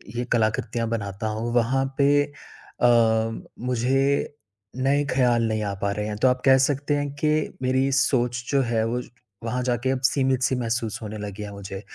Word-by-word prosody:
ये 120 - -1
कलाकृतियाँ 115 +1 0
बनाता 100 -1 -3
हूँ, 110 +2 -3
वहाँ 130 +3 +2
पे 140 0 +4
अ, 145 -3 -7 0.7
मुझे 135 +4 0 0.5
नए 140 +2 +3
ख़याल 120 -3 +3
नहीं 110 -1 -1
आ 100 -1 -2
पा 100 0 0
रहे 105 +1 -3
हैं, 105 - -3
तो 130 - +3
आप 125 0 +1
कह 135 0 +7
सकते 145 +1 -1
हैं 145 -1 -2
कि 155 +1 0
मेरी 130 +1 +1
सोच 125 -2 +1
जो 140 -1 +3
है 115 -1 +1
वो 125 +2 -1 0.4
वहाँ 125 +2 -2
जाके 125 +1 0
सीमित-सी 130 -1 +2
महसूस 115 -2 -2
होने 110 0 -6
लगी 105 0 -6
है 105 - -7
मुझे। 100 -1 -7
125 Hz, 170 wpm, -24 LUFS, 110-135 Hz, 0.7 s, कह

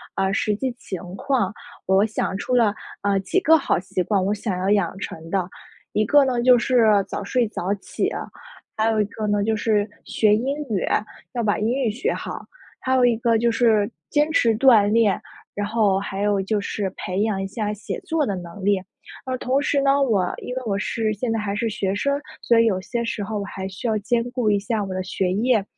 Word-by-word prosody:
呃， 195 0 0
实 210 +1 +1
际 260 +4 -2
情 185 - -6 0.2
况， 235 -3 0 0.3
我 190 +1 +4
想 215 -3 -1
出 250 - -1
了， 225 -4 +4 0.3
呃， 200 -1 +2
几 195 - 0
个 320 -4 +6
好 305 - +1
习 190 0 -3
惯， 195 +1 +1
我 200 - +1
想 205 -2 -3
要 185 +1 -2
养 195 -3 +1
成 165 -4 -7
的。 185 -1 0 0.5
一 215 - +2
个 290 +3 +5
呢， 250 -2 0
就 250 0 +6
是 225 -5 +3
早 205 - -4
睡 240 +3 +1
早 190 -2 -3
起 195 - -3
啊； - - -4 0.5
还 220 +1 +2
有 220 -1 +1
一 210 - +3
个 215 +1 -5
呢， 205 -1 +1
就 220 +1 +1
是 210 -1 +1 0.2
学 210 -1 +3
英 265 +6 -1
语， 195 - 0 0.5
要 240 -2 -1
把 210 0 +1
英 210 - 0 0.2
语 225 - +1
学 235 +5 -1
好； - - -5 0.4
还 260 0 0
有 255 -1 +4
一 240 -1 +4
个 230 0 +2
就 235 +1 +2
是 225 -3 +3 0.2
坚 295 +1 +2
持 230 -8 +3
锻 230 -5 +6
炼； 220 -3 +4 0.4
然 205 0 -2
后 210 -3 +2
还 195 0 -4
有 205 -1 +2
就 205 +2 0
是 200 -1 -2
培 185 +2 -2
养 215 -2 0
一 195 - -2
下 210 +2 -3
写 210 0 -5
作 325 -5 -1
的 200 - -2
能 180 +2 -8
力。 200 -2 +3 0.4
而 260 -1 -2
同 260 +3 +1
时 280 0 +1
呢， 275 0 +3
我 200 -9 +1
因 250 - -6
为 260 - -2
我 200 -2 0
是 215 +1 -1
现 230 +3 -2
在 225 - 0
还 205 -1 -2
是 230 +3 -1
学 200 -3 -1
生， 280 +7 0 0.2
所 235 -1 +4
以 230 - +5
有 190 -4 +1
些 235 +5 -3
时 230 -3 -3
候 210 +1 -3
我 - - -3
还 190 -1 -6
需 190 +5 -5
要 220 -1 +1
兼 230 +3 0
顾 245 -4 +1
一 205 - +2
下 210 +1 -1
我 190 -1 -5
的 185 - -2
学 185 0 -1
业。 225 +1 +2
215 Hz, 245 characters per minute, -23 LUFS, 200-240 Hz, 0.5 s, 个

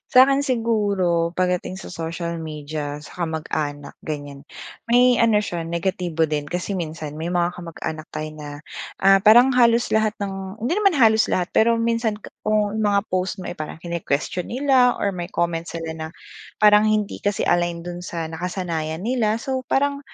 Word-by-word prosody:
Sa'kin 275 +2 +6
siguro, 205 -9 +1
pagdating 180 0 -1
sa - - -9
social 170 0 -4
media, 150 -1 -5
sa 170 +4 -5
kamag-anak, 155 -3 -4
ganyan. 145 -2 -6 0.4
May 245 +1 +5
ano 225 -3 +4
siya, 175 -5 -4
negatibo 170 -1 -1
din. 150 -1 -1
Kasi 180 +5 -3
minsan, 155 -3 -5
may 165 +3 -3
mga 175 0 +1
kamag-anak 160 -2 -6
tayo 155 0 -4
na, 150 -1 -8 0.5
ah, 195 0 +6
parang 240 +5 +8
halos 235 -1 +4
lahat 220 -1 +2
ng 195 0 -5
hindi 250 +9 +1
naman 400 -4 +3
halos 220 -4 +5
lahat. 180 0 0
Pero 230 +1 +4
minsan 230 -2 0
k - - -10 0.2
kung 215 0 +1
mga 205 -1 +3
post 185 +3 -1
mo 185 - -6
ay - - -6
parang 155 +1 -6
kine-question 170 0 -2
nila, 255 -1 +3
or 200 - 0
may 175 -1 -5
comment 170 -1 -1
sila, 165 -1 -5
na 160 0 -5 0.5
parang 210 0 +6
hindi 215 -1 0
kasi 205 -1 0
align 175 -1 +1
do'n 175 0 -6
sa 165 -2 -4
nakasanayan 165 -1 -3
nila. 225 -3 +1
So, 260 +1 -3
parang, 280 +1 +1
180 Hz, 165 wpm, -22 LUFS, 165-220 Hz, 0.5 s, parang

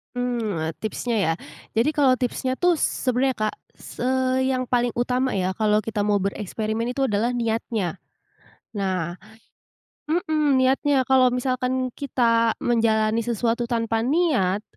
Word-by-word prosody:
Mmm, 225 -10 -2
tipsnya, 230 +2 -3
ya? 165 -4 +2 0.4
Jadi, 230 +6 +3
kalau 280 -4 +3
tipsnya 255 +1 -2
tuh 350 -1 +2
sebenarnya 255 0 0
Kak, 215 -1 -2 0.2
s - - -13
eee, 260 +1 +1
yang 255 - -1
paling 245 -1 0
utama 250 +1 0
ya, 185 -1 0
kalau 210 +1 +1
kita 210 -2 -2
mau 205 -2 +2
bereksperimen 215 +3 -2
itu 260 +2 -1
adalah 235 0 0
niatnya. 225 -6 -2 0.7
Nah 185 -4 -2 0.9
mhm, 310 -3 +1
niatnya, 265 +1 +3
kalau 260 -1 +5
misalkan 255 0 -1
kita 230 -5 +2
menjalani 225 -1 +2
sesuatu 235 +1 0
tanpa 230 -1 -1
niat, 255 - +1
240 Hz, 130 wpm, -23 LUFS, 215-260 Hz, 0.9 s, kalau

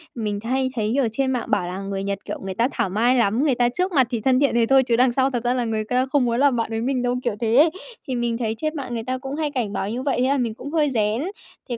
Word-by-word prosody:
mình 210 -3 -2
hay 260 +2 0
thấy, 215 -2 -1
kiểu, 270 -4 +2
trên 265 +3 0
mạng 245 -3 -2
bảo 175 - +1
là 185 +2 -5
"Người 195 0 -4
Nhật, 200 0 -2
kiểu, - - -5
người 190 -1 -5
ta 235 +5 +2
thảo 190 - -1
mai 235 +6 +2
lắm! 235 +3 +2
Người 280 -5 +2
ta 240 0 +2
trước 365 +9 -1
mặt 265 -7 +3
thì 235 -4 -2
thân 260 +1 +3
thiện 280 -3 +2
thế 235 -1 +4
thôi 270 +2 +5
chứ 240 -2 +1
đằng 250 +1 +4
sau 265 +1 +2
thật 245 -2 -3
ra 245 +1 +1
là 245 -2 -1
người 220 -1 -1
ta 250 +4 0
không 265 -1 +1
muốn 235 0 0
làm 280 -2 +4
bạn 230 -1 -1
với 225 0 -2
mình 255 0 0
đâu", 245 0 0
kiểu 235 -4 -1
thế 230 -1 +1
ấy. 300 +5 +7 0.4
Thì 255 - -2
mình 235 -1 -1
thấy 225 -2 -2
trên 310 +6 -2
mạng 260 -5 -5
người 225 -1 -3
ta 255 +2 -2
cũng 270 +1 -6
hay 305 -1 -2
cảnh 235 -7 -2
báo 195 - -2
như 250 +4 -3
vậy 275 -3 0
thế 255 - +2
là 280 - +2
mình 235 -4 -1
cũng 285 +5 -8
hơi 305 -3 +2
rén. 215 +2 +1 0.5
Thế 240 - -3
245 Hz, 320 wpm, -22 LUFS, 225-265 Hz, 0.5 s, ấy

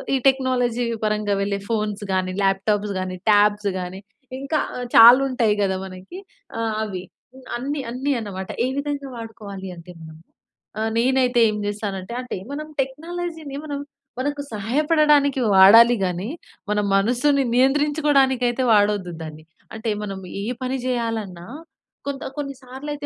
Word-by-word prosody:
ఈ - - +3
టెక్నాలజీ 250 -3 +1 0.2
పరంగా 210 -1 0
వెళ్ళే 200 0 -1
ఫోన్స్ 210 -2 -2
గానీ, 185 0 0
ల్యాప్టాప్స్ 200 +1 +1
గాని, 185 0 -4
టాబ్స్ 205 0 +3
గాని 180 +1 -6 0.4
ఇంకా 300 +3 -1 0.4
చాలుంటాయి 240 -2 +7
కదా! 190 -1 0
మనకి 190 - -10 0.4
ఆ! - - -2 0.2
అవి 190 -4 -5 0.5
అన్ని, 280 +4 -3
అన్ని 260 +4 -2
అన్నమాట. 190 -3 -6 0.2
ఏ - - 0
విధంగా 285 -1 -3
వాడుకోవాలి 205 -4 -8
అంటే 170 +1 -11
మనం 160 0 -11 0.6
ఆహ్, 220 +1 0
నేనైతే 250 0 +2
ఏం 210 - -2
చేస్తానంటే, 205 -1 -4
అంటే 250 - -5 0.2
మనం 305 +1 -5
టెక్నాలజీ‌ని 320 +1 -5
మనం 285 -2 -4 0.4
మనకు 290 +2 -2
సహాయపడడానికి 285 +5 +2
వాడాలి 225 +6 +8
గాని, 180 +2 -2 0.4
మన 210 0 +1 0.2
మనసుని 250 +7 +2
నియంత్రించుకోవడానికి 275 0 +3
అయితే 240 +2 -1
వాడొద్దు 205 -3 +2
దాన్ని. 155 -1 -8 0.3
అంటే 225 0 -4
మనం 195 -2 -5 0.2
ఏ - - -4 0.2
పని 255 +1 -1
చేయాలన్నా 225 -8 -3 0.6
కొంత 280 -1 -4
కొన్ని 280 -1 -3
సార్లయితే 285 +3 -7
230 Hz, 130 wpm, -22 LUFS, 200-275 Hz, 0.6 s, వాడాలి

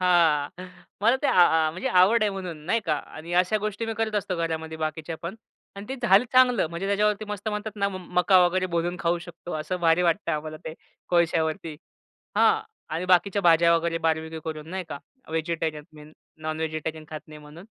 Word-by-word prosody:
हां. 165 -5 +3 0.5
मला 235 +4 +5
ते - - +3
आ 180 - +5 0.2
आ 155 - 0
म्हणजे 180 +3 -3
आवड 190 +5 +5
आहे 210 - +2
म्हणून 185 -5 -6
नाही 230 +5 +2
का. 155 - +2
आणि 160 +3 -9
अशा 185 +4 0
गोष्टी 215 +2 -3
मी 225 - -3
करत 220 -1 -1
असतो 200 -3 -1
घरामध्ये 160 -1 -3
बाकीच्या 160 +1 -4
पण 170 +4 -4 0.4
आणि 200 +1 -8
ते 265 - -4
झालं 195 +4 +6
चांगलं. 250 -6 +5
म्हणजे 170 +3 -4
त्याच्यावरती 210 +1 +1
मस्त 210 +1 -4
म्हणतात 210 0 -4
ना 200 - +3 0.3
मका 185 +1 +5
वगैरे 185 +1 0
भुणून 175 +1 -1
खाऊ 170 +1 +1
शकतो. 175 0 -9
असं 180 +4 -4
भारी 165 +2 +4
वाटत 165 0 -1
आम्हाला 155 +1 -6
ते 160 - -6 0.3
कोळश्यावरती. 165 -1 0 0.6
हां. - - +4 0.3
आणि 165 +3 -2
बाकीच्या 190 +2 +3
भाज्या 170 0 +5
वगैरे 165 0 -1
बार्बेक्यू 160 0 -1
करून 155 -1 -6
नाही 190 0 -4
का 145 - -6 0.3
व्हेजिटेरियन 160 -1 -2
मी 150 -1 -13
न 150 - -15 0.3
नॉनव्हेजिटेरियन 155 0 -3
खात 155 -1 -6
नाही 155 -1 -11
म्हणून. 150 +4 -13
170 Hz, 190 wpm, -25 LUFS, 160-195 Hz, 0.6 s, झालं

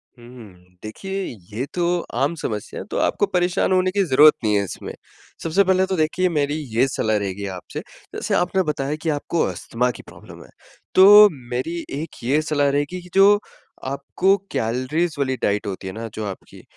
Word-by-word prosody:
हुँ, 120 -2 -16
हुँ। 95 -7 -15
देखिए, 195 - -5 0.3
ये 120 +5 -2
तो 175 0 +1 0.2
आम 145 +5 0
समस्या 105 -2 -4
है, - - -7
तो - - -2
आपको - - +1
परेशान 180 +1 +1
होने 185 0 +2
की 200 0 +1
ज़रूरत 150 -1 +6
नहीं 105 -1 +2
है 100 - +2
इसमें। 95 - -7 0.5
सबसे 170 +5 +3
पहले 190 0 +2
तो 190 0 -2
देखिए, 165 +4 +1
मेरी 145 -2 0 0.2
ये 125 +4 +4
सलाह 110 -4 0
रहेगी 100 0 -4
आपसे, 90 - -8 0.4
जैसे - - -3
आपने 185 +2 +1
बताया 150 -2 -2
कि 165 - -1
आपको 155 +2 -1
अस्थमा 115 +7 -2
की - - -12
प्रॉब्लम - - -13
है, - - -18 0.5
तो 205 +2 +9 0.2
मेरी 160 +8 -3 0.2
एक 160 - -9
ये 140 +6 +2
सलाह 145 -2 +1
रहेगी 145 +6 -2
कि 180 - -15
जो 200 +1 +6 0.5
आपको 140 +8 +1 0.2
कैलरीज़ 130 +9 -1
वाली 130 -2 0
डाइट 105 0 0
होती 95 0 -5
है 95 - -5
ना 115 +1 -6
जो 110 - -5
आपकी, 95 -2 -9
145 Hz, 185 wpm, -22 LUFS, 115-180 Hz, 0.5 s, तो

